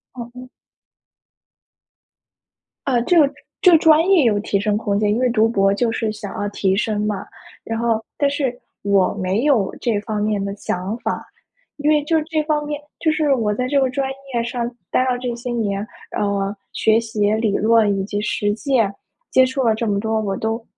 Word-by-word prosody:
好 240 - -5
的。 255 0 -10 2.4
呃， 250 -3 +2
这 350 +4 +4
个 285 -2 +4 0.3
这 365 -3 +7
个 330 - +8
专 320 +2 +5
业 360 -7 +5
有 210 -3 +3
提 200 -1 -1
升 210 0 0
空 205 -2 -1
间， 210 -1 +1
因 215 - +1
为 255 - +2
读 225 -1 +3
博 195 -3 +2
就 230 +2 0
是 225 -1 -1
想 210 -2 -7
要 205 - -1
提 190 -2 0
升 210 +1 0
嘛。 210 -1 -2 0.4
然 225 0 -3
后， 230 -1 0
但 285 - +2
是 270 -4 -2 0.2
我 200 -2 +3
没 195 +4 -1
有 230 -10 +2
这 225 -4 +1
方 210 -1 -3
面 210 -2 0
的 200 - -3
想 195 +1 -3
法， - - -3 0.5
因 295 0 0
为 300 -1 +3
就 320 +1 +1
这 315 -1 -1
方 300 -1 0
面 295 0 -4 0.2
就 315 - +2
是 305 -3 +2
我 220 -5 0
在 250 +3 -1
这 280 +2 +2
个 265 - +2
专 270 +1 -1 0.3
业 235 -1 +1
上 235 0 -3 0.2
待 255 - +3
了 245 - +1
这 245 -1 -3
些 245 +1 -6
年， 210 -3 -1 0.3
呃， 200 0 -1 0.2
学 220 +1 +3
习 215 -2 0
理 220 -2 +1
论 215 -2 +3
以 - - -1
及 205 0 -3
实 205 -1 0
践 225 -4 +1 0.4
接 260 - +6
触 260 +1 -1
了 225 -2 +3
这 225 +1 -2
么 200 -1 +1
多， 220 0 0
我 195 -2 -2
都 225 +1 -2
225 Hz, 215 characters per minute, -20 LUFS, 205-260 Hz, 2.4 s, 个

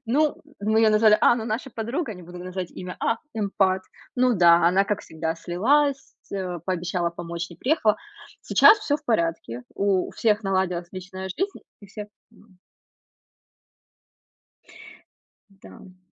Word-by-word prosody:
Ну, 290 +6 +2 0.2
мы 220 +2 +2
её 220 -1 +5
назвали, 215 0 +5
а, - - +5
ну 225 - -4
наша 230 +4 -3
подруга, 235 +3 -3
не 180 - -12
буду 175 +1 -10
называть 180 0 -5
имя, 180 0 -8
а, 230 - 0 0.2
эмпат. 195 -3 +1 0.3
Ну 250 -1 +3
да, 170 -2 +6
она 190 +3 +4
как 210 0 -2
всегда 160 0 -4
слилась 270 - +1 0.2
э, 180 -3 -3
пообещала 180 -1 -1
помочь, 170 +1 -6
не 170 - -12
приехала. 245 - +2 0.4
Сейчас 440 - +6
всё 305 -9 0
в 300 - -22
порядке, 165 - -1
у 195 -2 +1
у - - -9
всех 215 -1 +1
наладилась 185 -3 -1
личная 185 0 -7
жизнь 390 - -3 0.2
и 200 - -13
всех 210 +1 -8 0.2
нам. 210 -4 -23 2.9
Да, 195 -1 -17
м. 185 -1 -16
195 Hz, 150 wpm, -24 LUFS, 180-225 Hz, 2.9 s, да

